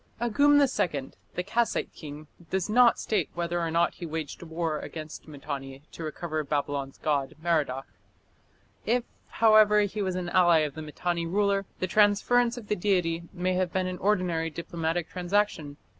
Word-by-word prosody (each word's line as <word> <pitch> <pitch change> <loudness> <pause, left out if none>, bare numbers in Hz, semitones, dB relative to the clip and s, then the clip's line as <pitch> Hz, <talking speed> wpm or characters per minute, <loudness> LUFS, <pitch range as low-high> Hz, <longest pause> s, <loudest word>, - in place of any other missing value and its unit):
Agum 285 +5 +4
II, 175 - 0 0.2
the 180 - -1
Kassite 225 +4 0
king, 150 0 -9 0.2
does 190 +2 -1
not 240 +1 +6
state 215 - -1
whether 170 0 -1
or 165 - -1
not 170 +1 +2
he 175 - -8
waged 160 -2 -5
war 165 -2 -2
against 155 -1 -8
Mitanni 140 -2 -7
to 165 - -8
recover 155 0 -3
Babylon's 140 -1 -2
god 145 -3 -1
Merodach. 150 -6 0 1.0
If, 240 +2 +1 0.2
however, 215 -2 +5
he 205 +1 -2
was 185 -2 -1
an 180 -1 -3
ally 175 -3 +5
of 150 -2 -2
the 155 - -7
Mitanni 170 +2 -2
ruler, 200 +1 +1
the - - 0
transference 215 +5 +3
of 225 -4 -8
the 210 - +1
deity 175 -4 0
may 185 0 -1
have 180 -1 0
been 185 -1 0
an 185 0 -4
ordinary 180 -5 +1
diplomatic 165 +1 -3
transaction. 180 -5 -1
175 Hz, 160 wpm, -27 LUFS, 155-205 Hz, 1.0 s, not